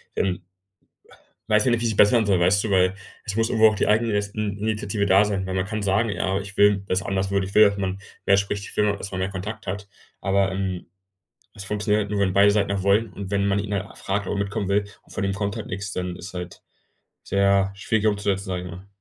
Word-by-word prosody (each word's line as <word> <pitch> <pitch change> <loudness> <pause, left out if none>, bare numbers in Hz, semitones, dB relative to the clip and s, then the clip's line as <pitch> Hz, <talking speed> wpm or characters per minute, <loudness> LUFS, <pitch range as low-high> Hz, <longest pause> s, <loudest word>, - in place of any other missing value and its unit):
dann 95 -2 -1 1.1
weiß 105 +2 +4
ich 125 - +3
nicht, 120 -1 +1
wie - - -2
es 115 - +2
sich 105 - -3
bessern 110 +2 +5
soll, 95 -3 +2
weißt 95 +4 +3
du? 110 - -2
Weil 95 0 +3 0.3
es 100 - -5
muss 115 +1 +1
irgendwo 110 -1 +5
auch 110 - -3
die - - 0
Eigenin 110 0 +2 0.4
Initiative 105 -1 -1
da 100 +1 +5
sein, 100 -2 -2
weil 95 - -4
man 95 0 0
kann 110 0 -4
sagen: 100 +3 +1
„Ja, 95 -1 -1
ich 100 0 -9
will, 100 -1 +4
dass 95 +1 0
anders 95 0 -1
wird. 100 -1 +1
Ich 100 - -9
will, 105 -1 +7
dass 100 - -6
man 95 0 -2 0.3
mehr 100 - +5
spricht. 100 0 -2
Ich - - -9
will, 105 -1 +2
dass 100 0 -7
man 95 - -4
mehr 95 +1 -1
Kontakt 100 +4 -6
hat.“ 100 +2 -4 0.3
Aber, 95 0 +1
ähm, 95 -2 -3 0.7
es 100 - -8
funktioniert 105 +1 0
halt 100 - -7
nur, 105 -1 -1
wenn 95 -2 +2
beide 100 +2 +5
Seiten 100 -1 +1
auch 100 -1 -1
wollen 100 +1 +2
und 100 +1 -7
wenn 100 0 +1
man 100 0 +1
ihn 100 0 -3
halt 100 +1 -5
fragt, 100 +1 -2
ob - - -1
er - - -2
mitkommen 100 0 -2
will 100 +1 +2 0.2
und - - -18
von 100 - -2
ihm 95 - 0
kommt 100 0 -3
halt - - -6
nix, 95 +2 -5
dann 90 -1 -3
ist 90 +2 -9
halt 90 -1 -7 0.6
sehr 100 0 +2
schwierig 105 +3 -1
umzusetzen, 100 -1 0
sage 90 -1 -3
ich 90 - -7
mal. 90 +3 -10
100 Hz, 255 wpm, -24 LUFS, 95-105 Hz, 1.1 s, will